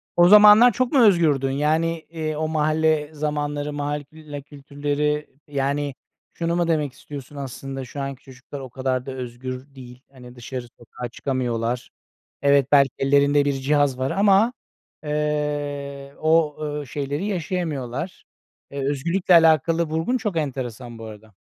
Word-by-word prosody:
O 175 0 +6
zamanlar 210 +3 +9
çok 255 -1 0
mu 270 - +5
özgürdün? 155 -9 +3
Yani, 160 +3 0
eee, 155 -2 -3
o 155 0 -1
mahalle 155 0 +1
zamanları, 145 -1 -2
mahalle 145 0 -3
külle 150 -1 -10
kültürleri, 145 +1 -2 0.2
yani 140 0 -1 0.4
şunu 170 0 -1
mu 175 -1 +1
demek 150 -5 0
istiyorsun 145 0 -10
aslında 135 0 -6
şu 140 +3 -7
anki 135 -2 -6
çocuklar 135 +2 -10
o 130 -2 -8
kadar 130 0 -2
da 135 - -5
özgür 130 +2 -7
değil, 125 -1 -12
hani, 125 -2 -13
dışarı 120 0 -7
sokağa 120 +1 -8
çıkamıyorlar. 120 -2 -2 0.5
Evet, 140 -2 +4
belki 140 -2 +6
ellerinde 140 +1 +3
bir 140 - +1
cihaz 140 0 +1
var 130 +1 -1
ama, 205 +4 +4 0.5
eee, 145 -2 -3
o, 155 -1 +3
ııı, 150 -2 -4
şeyleri 145 +6 -3
yaşayamıyorlar. 170 - -3 0.5
Eee, 140 -1 -3
özgürlükle 170 +6 +1
alakalı 165 0 +5
vurgun 160 +11 -1
çok 210 -7 -3
enteresan 125 -5 -4
bu 110 - -8
arada. 110 -1 -12
145 Hz, 140 wpm, -23 LUFS, 135-155 Hz, 0.5 s, zamanlar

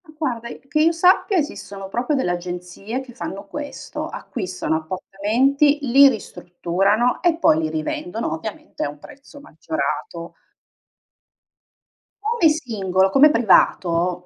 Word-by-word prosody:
Ma 310 - -17
guarda, 235 -6 -3
i - - -9
che 305 +2 +1
io 325 +2 +5
sappia 365 +4 +3
esistono 200 - -4
proprio 245 +9 -1
delle 260 -10 0
agenzie 180 +6 -5
che 255 -2 -12
fanno 200 -4 -7
questo, 290 +8 -6
acquistano 185 - -3
appartamenti, 220 - +1
li 275 +2 +7
ristrutturano 195 +2 -1
e 345 -2 +2
poi 160 - +4
li 160 -1 -1
rivendono, 160 +6 -3
ovviamente 200 +7 -6
a - - -1
un 145 - -10
prezzo 280 - -15
maggiorato. 290 - -4 1.9
Come 435 -7 +3
singolo, 195 - 0
come 285 +8 +6
privato, 180 - +2
220 Hz, 125 wpm, -21 LUFS, 180-285 Hz, 1.9 s, li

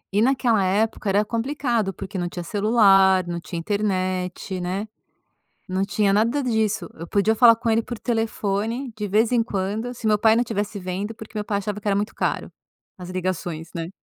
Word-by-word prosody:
E 205 - +4
naquela 240 -4 +3
época 205 +2 0
era 205 +2 +2
complicado 235 -2 -1
porque 195 0 -6
não 175 0 -2
tinha 175 0 -6
celular, 195 -2 +4
não 170 0 -3
tinha 170 0 -7
internet, 185 -1 -2
né. 190 +4 -3 0.8
Não 185 +1 0
tinha 200 0 +1
nada 230 +8 +2
disso, 220 -5 0
eu 165 +1 -9
podia 205 +4 +2
falar 230 0 +7
com 235 0 -3
ele 225 +1 +3
por 240 0 -7
telefone 225 +1 -2
de 210 -1 -3
vez 215 +4 +2
em 235 -2 +4
quando 210 +4 -3
se 235 - -13
o - - +3
meu 210 -1 +3
pai 220 +1 +5
não 240 - +3
estivesse 210 -2 -3
vendo, 190 +3 -4
porque 220 0 -11
meu 210 - -2
pai 205 -1 -1
achava 205 +1 -4
que 210 - -3
era 200 - +2
muito 205 +1 -2
caro, - - -2 0.5
as 180 -1 -8
ligações 175 -3 -3
né. 165 -1 -4
210 Hz, 195 wpm, -23 LUFS, 190-225 Hz, 0.8 s, falar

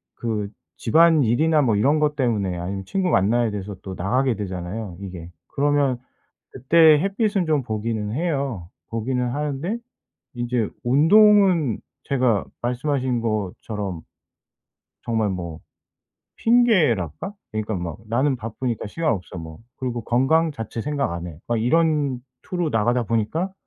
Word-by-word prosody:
그 110 -3 -3 0.3
집안일이나 155 +1 +4
뭐 120 -6 +2
이런 140 +9 +3
것 150 -1 +1
때문에 105 -9 0
아니면 95 +3 -4
친구 185 - 0
만나야 110 - +2
돼서 100 0 -5
또 95 - -6
나가게 125 +8 +1
되잖아요 95 0 -5
이게. 90 -3 -8 0.2
그러면 140 -3 +1 0.5
그때 155 +4 +5
햇빛은 200 0 0
좀 150 -4 +2
보기는 110 -2 -3
해요. 135 - -2 0.2
보기는 125 +2 -1
하는데 150 - -2 0.6
인제 120 -2 -1
운동은 170 - +5 0.2
제가 125 -6 +1 0.2
말씀하신 125 0 -1
것처럼 105 -3 -3 1.0
정말 110 -3 0
뭐 85 -4 -5 0.8
핑계랄까? 195 - +2 0.2
그러니까 110 0 -2
막 85 -3 -5
'나는 130 +5 +1
바쁘니까 115 0 -4
시간 160 +8 -1
없어.' 95 -2 -7
뭐 80 -1 -8 0.2
그리고 125 -2 -3
'건강 155 +8 +2
자체 115 -3 -5
생각 145 -2 -1
안 85 +1 -5
해.' 80 -3 -10
막 120 - 0
이런 150 -1 +2 0.2
투로 175 -2 -2
나가다 120 +1 +1
보니까 115 - -1
120 Hz, 285 characters per minute, -23 LUFS, 105-150 Hz, 1.0 s, 그때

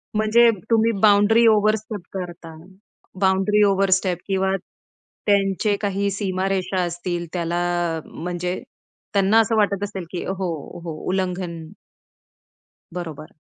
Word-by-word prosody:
म्हणजे 225 +2 +5 0.2
तुम्ही 225 0 +4
boundary 215 +2 +5
overstep 215 -1 +2
करता. 175 -3 -7 0.6
बाउंडरी 195 +2 +3
ओव्हरस्टेप 190 -2 +2
किंवा 190 0 +1 0.7
त्यांचे 200 0 +2
काही 200 0 0
सीमारेषा 190 -1 -1
असतील, 175 0 -3
त्याला 175 0 -1 0.5
म्हणजे 180 +2 -4 0.5
त्यांना 200 +3 +4
असं 225 0 +2
वाटत 200 -1 +1
असेल 195 -3 -4
की 180 - -4
हो, 190 -2 -2 0.3
हो, 165 -2 -5 0.2
उल्लंघन. 180 -2 -2 1.3
बरोबर. 160 -4 -7
190 Hz, 100 wpm, -22 LUFS, 180-205 Hz, 1.3 s, म्हणजे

